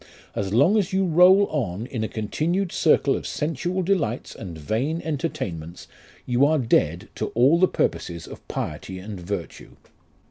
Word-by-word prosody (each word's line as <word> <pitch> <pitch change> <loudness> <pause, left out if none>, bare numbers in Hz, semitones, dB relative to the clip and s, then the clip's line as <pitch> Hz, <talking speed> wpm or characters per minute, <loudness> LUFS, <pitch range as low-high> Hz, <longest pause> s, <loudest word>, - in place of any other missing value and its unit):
As 95 -1 -3
long 150 - +4
as 195 -3 -1
you 190 0 +2
roll 180 +4 +6
on 110 - -2
in 125 -4 -4
a - - -1
continued 165 - -1
circle 150 -4 +3
of - - -5
sensual 170 +5 -2
delights 165 - -1
and 90 -7 -8
vain 120 - -1
entertainments, 90 - -4 0.4
you 125 +1 +2
arc 145 -4 +2
dead 85 -4 +1
to - - -3
all 135 +8 +5
the 185 - +5
purposes 85 - -2
of - - -12
piety 95 +5 -5
and 100 +1 -7
virtue. 90 -1 -6
130 Hz, 155 wpm, -24 LUFS, -, 0.4 s, roll